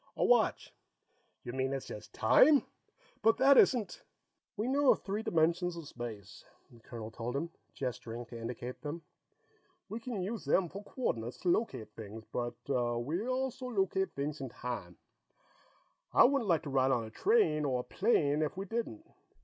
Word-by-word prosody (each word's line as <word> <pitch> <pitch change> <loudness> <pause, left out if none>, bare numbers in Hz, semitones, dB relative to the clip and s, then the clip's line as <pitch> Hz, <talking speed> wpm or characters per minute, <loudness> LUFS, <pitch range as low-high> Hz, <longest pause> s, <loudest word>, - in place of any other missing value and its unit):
A - - +2
watch." - - +3 0.7
"You 120 - -6
mean 130 +1 -1
it's 135 - -3
just 105 - -9
time? 275 - +5 0.6
But 225 0 +4
that 275 +1 +6
isn't 245 -5 +4 0.3
" - - -55
"We 215 +3 -1
know 280 +1 +3
of - - 0
three 205 +2 -2
dimensions 170 -1 +1
of 165 -3 -7
space," 110 -7 -8 0.3
the 120 - -16
colonel 115 -1 -8
told 120 +3 -4
him, 165 +4 -2 0.2
gesturing 120 -2 -4
to 115 - -9
indicate 120 +2 -6
them. 160 +2 -5 0.9
"We 220 +4 -4
can 230 -3 -4
use 215 +3 -4
them 180 -3 +2
for 200 +4 -8
coordinates 120 - -3
to 180 - +1
locate 135 - 0
things, 110 0 -8
but 120 -1 -2
we 125 - -1
also 255 0 -2
locate 195 -4 0
things 145 +1 -3
in 135 - -4
time. 115 -9 -6 1.1
I - - +7
wouldn't 250 -4 +3
like 165 -2 +3
to 145 - -5
ride 135 0 +3
on 125 -3 +2
a 110 - -8
train 375 - +3
or 130 -3 0
a - - -12
plane 155 - +2
if 155 +3 -1
we 195 - -3
didn't. 235 - -4
150 Hz, 175 wpm, -32 LUFS, -, 1.1 s, I